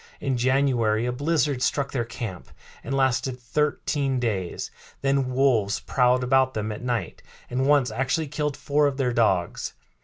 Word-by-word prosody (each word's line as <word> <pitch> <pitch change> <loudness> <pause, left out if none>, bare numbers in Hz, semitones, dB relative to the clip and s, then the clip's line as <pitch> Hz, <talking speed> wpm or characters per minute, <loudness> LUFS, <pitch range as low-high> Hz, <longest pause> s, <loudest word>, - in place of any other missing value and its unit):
In 135 -2 -1
January 120 -3 +2
a 125 - 0
blizzard 145 0 0
struck 140 +1 0
their 125 -3 -1
camp 110 -6 -7 0.3
and 135 - -2
lasted 130 -1 +1
thirteen 140 +1 -1
days; 100 -7 -2 0.3
then 135 -1 +1
wolves 125 -6 +2
prowled 125 0 +2
about 130 +1 +3
them 110 0 -2
at 105 - -6
night, 120 -7 -3 0.3
and 130 +2 0
once 140 -5 +4
actually 135 +7 -1
killed 150 0 -2
four 145 +1 +2
of 140 -1 -2
their 125 -3 0
dogs. 95 -7 0
130 Hz, 155 wpm, -25 LUFS, 120-140 Hz, 0.3 s, once